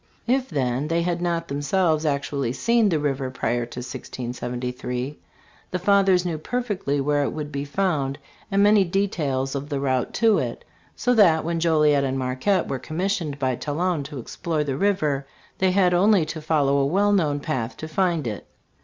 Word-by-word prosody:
If, 260 +2 +1
then, 135 -3 -1
they 165 +1 +1
had 175 0 -1
not 170 -1 -1
themselves 155 +2 +1
actually 140 -3 -1
seen 230 - +2
the 165 - +1
river 135 -3 -1
prior 120 -1 -1
to 125 - -7
1673, 125 +2 -5 0.5
the 180 - -2
Fathers 190 -1 +3
knew 165 -3 -2
per 245 +10 -2
fectly 185 - -2
where 145 +1 +1
it 140 - 0
would 150 -1 -5
be 140 0 -3
found 145 -4 -1 0.3
and 200 -1 +3
many 205 -1 +6
details 155 -8 -1
of 140 +1 -4
the 140 -2 -1
route 130 -2 0
to 225 -2 +4
it; - - -4 0.3
so 250 - +1
that 175 -9 +5
when 170 0 -1
Joliet 150 -4 +3
and 135 -1 -1
Marquette 130 +10 0
were 135 - -3
commis 180 - -1
TRACV - - -2
\ - - -4
sioned 145 -2 -5
by 130 -2 0
Talon 160 +4 -1
to 145 0 -8
explore 155 +5 -3
the 140 -3 -2
river, 150 -6 0 0.3
they 190 - +3
had 185 -1 +3
only 190 -1 +4
to 155 0 -6
follow 145 -3 +2
a 140 - +2
well 200 +6 +2
known 155 -8 +2
path 125 -4 -3
to 155 - -6
find 170 -2 0
it. 105 -3 -5
150 Hz, 190 wpm, -24 LUFS, 135-185 Hz, 0.5 s, many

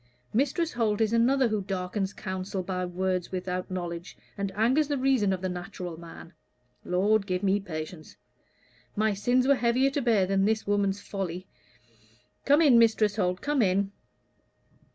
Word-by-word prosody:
Mistress 295 - 0
Holt 220 -4 0
is 220 0 +1
another 250 +2 +3
who 215 -1 -1
darkens 190 0 -3
counsel 190 -1 -4
by 185 0 -3
words 180 0 -2
without 180 0 -3
knowledge, 175 -1 -5 0.2
and 200 -1 -3
angers 255 +8 +2
the 290 -1 -1
reason 255 -6 +2
of 185 -1 -2
the - - 0
natural 180 -1 -6
man. 170 +1 -12 0.5
Lord, 200 +3 +1
give 185 +1 -2
me 200 +1 +2
patience. 155 -3 -7 0.8
My 215 0 +2
sins 245 +6 +1
were 280 - +6
heavier 250 +2 +2
to 285 - -1
bear 225 -6 +3
than 195 +1 +1
this 220 +1 0
woman's 200 -1 +1
folly. 185 -2 -5 1.0
Come 290 +4 +5
in, 255 -6 +6
Mrs. 220 -2 +3
Holt 180 -2 0
come 290 -2 +1
in." 195 0 +1
200 Hz, 155 wpm, -27 LUFS, 185-235 Hz, 1.0 s, were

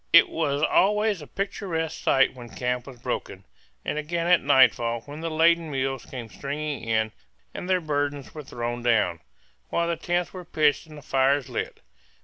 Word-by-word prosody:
It 170 - +8
was 145 -2 -1
always 210 +1 +3
a 150 - -10
picturesque 180 - -3
sight 135 -1 +4
when 120 -2 -10
camp 125 +1 -2
was 130 -3 -10
broken, - - -4 0.4
and 150 - -1
again 165 +2 -2
at 175 0 +5
nightfall 120 -4 +4
when 145 +5 -9
the 165 - -2
laden 165 +1 +3
mules 135 -2 -2
came 125 -3 -7
stringing 145 +5 -4
in 110 -1 +1 0.4
and 180 - -6
their 185 -1 +3
burdens 145 -3 -2
were 155 - -6
thrown 120 -3 -4
down, 110 -8 +2 0.5
while 170 0 0
the 170 - 0
tents 175 +1 -1
were 185 -1 -7
pitched 155 -1 +1
and 155 -1 -12
the 145 - -11
fires 135 -1 +2
lit. - - -4
145 Hz, 175 wpm, -26 LUFS, 130-170 Hz, 0.5 s, It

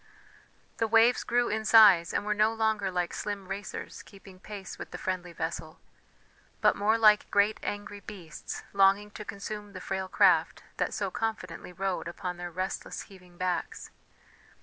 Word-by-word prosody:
The 225 - +1
waves 230 +2 +4
grew 240 0 +1
in 220 +1 -1
size, 205 -6 +7
and 205 - -1
were 210 - +1
no 215 +1 +3
longer 220 -3 +1
like 180 -2 -2
slim 200 -2 -4
racers 195 +1 -6
keeping 195 -2 -15
pace 200 -1 -9
with - - -7
the - - -7
friendly 185 -2 -3
vessel, 160 -1 -5 0.8
but - - +4
more 215 +2 +2
like 215 -2 +5
great 205 +1 +2
angry 205 0 -5
beasts 180 -5 -8
longing 200 +1 +4
to 210 - -8
consume 205 0 -7
the 185 - -7
frail 190 0 -3
craft - - +3
that - - -1
so - - -2
confidently 215 -6 -4
rode 185 -1 -3
upon 180 +1 -5
their 175 0 -5
restless 185 +3 -4
heaving 180 -3 -17
backs. 180 -1 -3
200 Hz, 160 wpm, -29 LUFS, 185-210 Hz, 0.8 s, size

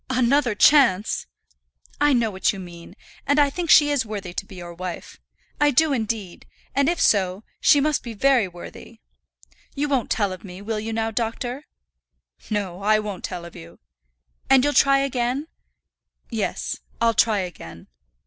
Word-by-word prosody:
"Another 255 -1 +2
chance!" 230 -6 +4 0.7
"I 295 0 +4
know 235 -4 +2
what 190 -1 +1
you 200 - -8
mean, 175 0 -11 0.3
and 285 - +2
I 290 -1 +4
think 345 +2 -4
she 295 -1 +6
is 285 -5 +1
worthy 205 -5 -6
to - - -4
be - - -12
your 175 -1 -9
wife. 180 0 -7 0.4
I 295 0 +4
do, 295 +2 +3
indeed; 220 -6 -4 0.3
and 280 +2 +2
if 345 - -1
so, 190 0 +2 0.2
she 290 - +5
must 300 +1 +1
be 235 -2 -8
very 255 -2 +3
worthy. 175 -1 -12 0.8
You 290 +1 -1
won't 270 -5 0
tell 205 -4 0
of 185 - -11
me, 185 -2 -10
will 215 +2 -3
you 220 +1 -5
now, 225 0 -1
doctor?" 240 +5 -3 0.8
"No; 200 -4 -3
I 215 +2 +3
won't 210 -3 -5
tell 175 -2 -5
of 170 - -12
you." 85 +1 -12 0.7
"And 265 -1 +6
you'll 290 +1 +1
try 275 -1 +5
again?" 260 +1 -1 0.9
"Yes; 220 -3 -3 0.2
I'll 230 0 +3
try 215 -2 +2
again." 85 - -9
225 Hz, 170 wpm, -23 LUFS, 190-275 Hz, 0.9 s, she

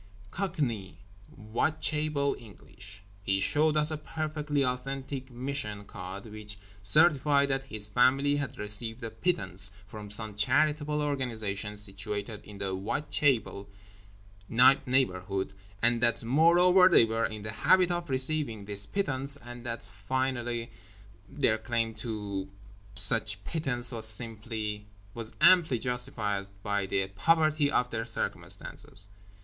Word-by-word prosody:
Cockney 140 - -3 0.3
Whitechapel 150 +5 0
English. 100 -2 -13 0.2
He 95 -1 0
showed 150 +9 +2
us 150 +1 +2
a 155 - -2
perfectly 150 -2 -2
authentic 135 +1 -4
mission 125 -5 -5
card 95 +2 -8
which 105 -1 -8 0.2
certified 140 +6 +6
that 135 0 -1
his 110 -5 -1
family 135 +6 +3
had 135 -3 -4
received 110 +3 -1
a 115 - -5
pittance 100 - +1 0.2
from 105 0 -10
some 110 0 0
charitable 150 +7 +1
organisation 110 -7 -3
situated 105 +1 -3
in 105 -1 -12
the 100 -1 -2
Whitechapel 110 0 0 0.8
neighbourhood, 115 -7 +2 0.3
and 120 0 +3
that, 115 -1 +2
moreover, 175 +8 +5
they 170 - +6
were 115 +1 0
in 110 -1 -8
the 110 - -4
habit 180 +10 +3
of 175 -2 -3
receiving 130 -5 0
this 100 0 0
pittance; 140 - -2
and 120 -2 -11
that, 115 -2 -4
finally, 120 +3 -3 0.6
their 115 -7 +1
claim 115 0 -2
to 105 -4 -5 0.5
such 105 -4 +1
pittance 130 -6 0
was 110 -3 +2 1.2
amply 170 -6 +5
justified 115 -5 -2 0.2
by 100 -1 -1
the 95 0 -1
poverty 155 - +2
of 125 -3 0
their 115 0 -3
circumstances. 100 -3 -2
120 Hz, 120 wpm, -29 LUFS, 105-145 Hz, 1.2 s, certified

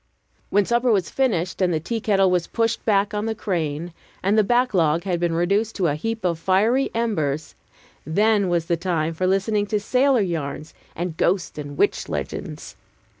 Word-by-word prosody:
When 205 0 +3
supper 235 +2 +2
was 190 -6 +1
finished, 190 -10 0
and 180 -1 +3
the 160 - 0
tea 225 +9 -3
kettle 195 -3 +3
was 180 -2 +1
pushed 230 -1 -1
back 200 -1 +2
on 210 +1 -2
the 220 - -2
crane, 170 -5 -3 0.3
and 195 +3 +2
the 215 - +5
backlog 195 -9 +2
had 180 -3 -1
been 170 -1 0
reduced 200 +6 +1
to 190 - 0
a 150 - +2
heap 225 +7 -3
of 170 -2 0
fiery 215 +10 +2
embers, 155 -11 -1 0.5
then 205 +4 +2
was 170 -2 0
the 170 0 0
time 165 -2 -1
for 185 +3 -1
listening 205 +2 +1
to 210 +1 0
sailor 255 +3 +2
yarns 155 -4 -4 0.2
and 170 -1 -4
ghost 175 -4 0
and 145 -1 -7
witch - - +1
legends. - - -5
190 Hz, 180 wpm, -23 LUFS, 165-215 Hz, 0.5 s, the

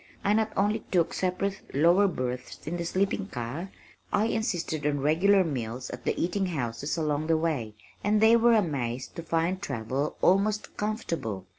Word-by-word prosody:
I 205 - +3
not 220 0 +1
only 210 +3 +2
took 170 -3 +2
separate 190 +1 -1
lower 175 +7 +5
berths 125 -7 -4
in 170 +3 -3
the 170 - -3
sleeping 195 +3 0
car, 140 +7 -5 0.4
I 205 +1 +2
insisted 185 - -1
on 145 -1 0
regular 185 +7 +4
meals 125 -5 -4
at - - -8
the - - 0
eating 190 +3 0
houses 140 -2 -3
along 155 -1 0
the 165 -1 +3
way, 145 -10 -2 0.3
and 210 +1 +3
they 220 +2 +6
were 235 0 +5
amazed 135 - -1
to - - -3
find 170 +3 0
travel 135 - -2
almost 205 +3 +2
comfortable. 165 - -3
170 Hz, 165 wpm, -28 LUFS, 140-200 Hz, 0.4 s, they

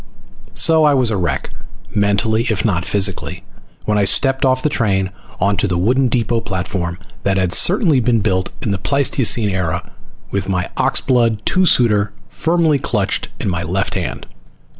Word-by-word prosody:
So 160 -1 +5
I 145 -2 +4
was 125 -4 +2
a - - 0
wreck, 85 -8 -2 0.4
mentally, 105 +3 +1
if 105 -1 -1
not 90 -5 0
physically, 95 -2 -1 0.4
when 105 -1 +1
I - - +2
stepped 135 +6 +3
off 130 -1 +1
the - - +2
train 95 -9 0 0.3
onto 100 +2 +1
the 90 -2 -1
wooden 125 +9 +2
depot 115 -1 0
platform 90 -3 -4 0.3
that 95 -1 +1
had 90 -1 +1
certainly 175 - +4
been 120 -2 +1
built 95 -3 0
in 105 - -1
the 95 - -2
Pleistocene 125 -4 +1
Era, 90 -4 -3 0.4
with 100 -1 -3
my 90 -2 -1
oxblood 115 -5 +1
two 185 0 +2
suiter 105 -7 +2 0.2
firmly 165 -3 +1
clutched 105 -6 -1
in - - -4
my 90 -3 -1
left 95 +4 -2
hand. - - -4
105 Hz, 160 wpm, -17 LUFS, 95-130 Hz, 0.4 s, So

